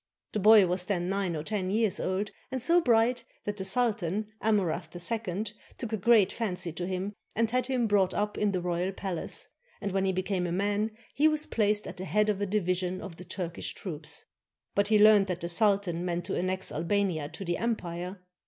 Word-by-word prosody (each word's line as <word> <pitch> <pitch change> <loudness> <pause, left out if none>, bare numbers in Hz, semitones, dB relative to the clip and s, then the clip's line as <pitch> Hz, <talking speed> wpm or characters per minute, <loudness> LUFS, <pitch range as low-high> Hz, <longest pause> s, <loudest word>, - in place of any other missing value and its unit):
The 215 - 0
boy 210 0 +8
was 180 0 0
then 180 -2 -1
nine 195 -3 -1
or 150 - -3
ten 195 -1 -2
years 215 0 +1
old, 195 +3 -1 0.2
and 260 - -1
so 340 +8 +4
bright 240 -2 +3 0.2
that 205 0 -3
the 190 - -3
sultan, 210 -2 +1
Amurath 185 -6 0
II, 210 +2 -2 0.2
took 230 -3 -5
a - - +1
great 215 -1 +5
fancy 180 -6 -2
to 175 +2 -4
him 190 +2 -3 0.2
and 230 0 +1
had 250 0 +1
him 255 -3 +1
brought 200 -3 +3
up 210 0 -1
in 210 -1 +1
the 185 -2 -1
royal 175 +1 -1
palace, 190 -3 -2 0.3
and 200 -2 -3
when 195 0 +1
he 190 - +2
became 185 -1 -1
a - - -3
man, 205 +4 0 0.2
he 300 +3 +4
was 305 0 +1
placed 210 -1 +1
at - - -7
the 185 - -5
head 210 +2 +2
of 205 -1 0
a 205 - 0
division 185 -2 0
of 180 -5 -8
the 180 - -9
Turkish 175 -3 -4
troops. 165 -5 -5 0.5
But 200 0 +2
he 215 0 +5
learned 210 -1 +7
that 180 -2 -3
the 170 - -3
sultan 195 -3 +2
meant 175 -1 -2
to 190 - -2
annex 185 +1 -1
Albania 170 -2 0
to 195 - -7
the 175 0 0
empire. 180 -5 -3
195 Hz, 210 wpm, -29 LUFS, 180-215 Hz, 0.5 s, boy